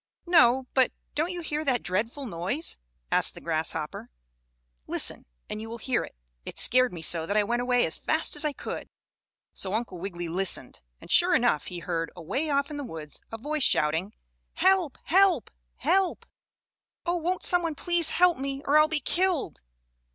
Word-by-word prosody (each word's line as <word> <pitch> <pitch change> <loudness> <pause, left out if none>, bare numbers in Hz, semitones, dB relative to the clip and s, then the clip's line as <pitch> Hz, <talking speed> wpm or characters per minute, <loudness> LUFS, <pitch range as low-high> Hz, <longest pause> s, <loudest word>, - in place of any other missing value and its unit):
"No, 265 -7 +5
but 260 -2 +3 0.2
don't 315 +4 0
you 355 -1 -4
hear 305 -1 -3
that 255 -5 0
dreadful 225 +9 -2
noise?" 200 - -2 0.3
asked - - +4
the - - -9
grasshopper. - - -2 0.8
"Listen, - - 0 0.2
and 215 - -5
you 225 - -7
will 230 - -6
hear 245 +1 -1
it. - - -11 0.3
It - - -8
scared 255 0 +4
me 170 -2 -8
so 165 -1 +1
that 200 - 0
I 210 - +4
went 240 +3 -1
away 245 0 +2
as 160 - -3
fast 315 0 +1
as 295 - +5
I 300 - +1
could." - - -7 0.6
So 195 +1 -2
Uncle 220 -6 -3
Wiggily 175 -2 -5
listened, 180 - -2 0.2
and - - -11
sure 355 +1 +5
enough 240 - +1
he 180 - -6
heard, 170 -1 -3
away 265 - -3
off 280 0 0
in 295 - -5
the 290 - -4
woods, 160 - -8
a 225 - -5
voice 300 +6 -3
shouting: 160 - +2 0.4
"Help! 375 -6 +2
Help! 370 - +3 0.2
Help! 380 - +1 0.8
Oh, 350 0 0
won't 355 +2 -2
some 355 -1 +4
one 330 -3 -2
please 345 0 +1
help 355 -4 +3
me, 275 +1 -4
or 295 +2 +5
I'll 305 - +5
be 310 -2 +2
killed!" 355 - 0
260 Hz, 180 wpm, -27 LUFS, 195-320 Hz, 0.8 s, No